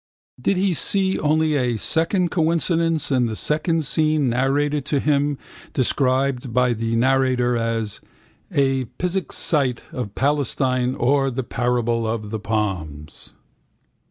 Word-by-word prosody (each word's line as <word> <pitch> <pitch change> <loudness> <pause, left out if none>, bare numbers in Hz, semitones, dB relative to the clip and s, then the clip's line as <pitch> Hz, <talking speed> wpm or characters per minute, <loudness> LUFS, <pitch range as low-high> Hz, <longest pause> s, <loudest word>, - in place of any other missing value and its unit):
Did 195 +8 +1
he 190 0 +2
see 190 +5 +1
only 155 +1 +2
a 125 -4 0
second 165 - 0
coincidence 165 -2 +1
in 125 -3 +2
the 110 - -4
second 155 +5 0
scene 155 -1 +2
narrated 140 +4 +1
to 145 -1 0
him, 145 0 +1 0.4
described 130 -2 0
by 125 +1 +2
the 115 0 -2
narrator 130 0 +2
as 115 -2 -2 0.5
A 135 -2 +1
Pisgah 180 +1 -2
Sight 135 -6 0
of 115 -6 -5
Palestine 130 -2 0
or 135 +2 +2
The 130 +1 -3
Parable 120 -1 -1
of 110 -2 -3
the 110 - -3
Plums? 95 -9 -4
135 Hz, 130 wpm, -22 LUFS, 120-150 Hz, 0.5 s, he